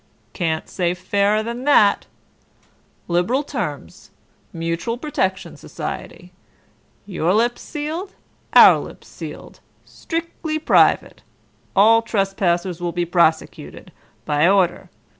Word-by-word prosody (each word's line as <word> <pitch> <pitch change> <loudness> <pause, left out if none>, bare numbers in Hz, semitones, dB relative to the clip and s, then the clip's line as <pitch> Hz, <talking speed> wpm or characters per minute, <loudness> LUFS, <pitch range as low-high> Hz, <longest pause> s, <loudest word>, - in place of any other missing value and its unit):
Can't 160 -3 -2
say 175 -1 -2
fairer 200 +4 0
than 235 +2 -5
that. 215 -9 +4 1.0
Liberal 180 +11 0
terms. - - -6 0.4
Mutual 165 +8 -3
Protection 190 -10 -3
Society. 180 0 -8 0.7
Your 180 -2 -1
lips 240 +2 0
sealed, 320 +6 -6 0.4
our - - +8
lips - - -11
sealed. - - -10 0.3
Strictly 330 -1 -5
private. 310 - +2 0.5
All 225 +3 +5
trespassers 190 -5 -1
will 175 -1 -2
be 175 0 -2
prosecuted. 170 -2 -1 0.3
By 150 +2 +2
order. 190 -3 +1
195 Hz, 100 wpm, -20 LUFS, 175-240 Hz, 1.0 s, our